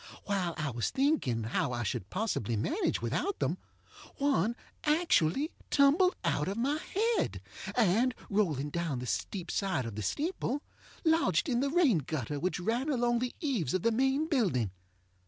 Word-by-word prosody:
While 185 -5 -1
I 150 -3 -1
was 115 -1 -1
thinking 265 - +1
how 115 +2 0
I 120 0 -2
should 100 -2 -3
possibly 185 - -1
manage 330 - 0
without 400 - -1
them, - - -1 0.6
one 240 - +2 0.3
actually 300 - +2 0.2
tumbled 300 +7 +4
out 150 - +1
of 195 +2 -2
my 280 +6 +1
head, 450 +7 0 0.4
and, 235 +3 +3
rolling 155 -9 0
down 170 -5 -1
the 125 - -4
steep 175 +7 -3
side 185 - 0
of 115 - -5
the 110 - -3
steeple, 290 - -2 0.4
lodged 320 - +3
in 240 -2 +1
the 280 +2 +1
rain 290 - +4
gutter 145 -1 -3
which 180 +4 -1
ran 235 +10 0
along 240 -3 +2
the 250 0 -3
eaves 225 - 0
of 185 - -1
the 230 - +3
main 265 +6 +2
building. 185 - +1
220 Hz, 160 wpm, -31 LUFS, -, 0.6 s, tumbled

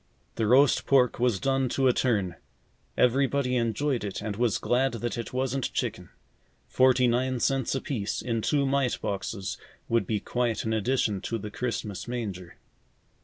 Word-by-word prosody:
The 110 - -1
roast 135 +4 +4
pork 125 -4 +3
was 120 -5 +2
done 135 +1 +1
to 135 +1 +2
a 125 - +4
turn. 100 -10 0 0.6
Everybody 130 +1 +2
enjoyed 120 +2 0
it 100 -2 -4
and 105 -1 -4
was 115 -1 +1
glad 130 +2 +1
that 120 0 -3
it 115 - -5
wasn't 130 0 -1
chicken. - - -3 0.6
Forty 130 -1 +4
nine 125 +1 0
cents 135 +2 0
apiece, 125 -6 -2
in 115 -2 -2
two 140 +4 +1
mite 135 -2 +1
boxes, 100 0 -4 0.3
would 115 0 +1
be 110 -2 0
quite 120 -2 -1
an 110 - -1
addition 110 -3 0
to 115 - -3
the 105 -1 -7
Christmas 110 -4 -4
manger. 100 -8 -5
120 Hz, 160 wpm, -27 LUFS, 110-130 Hz, 0.6 s, roast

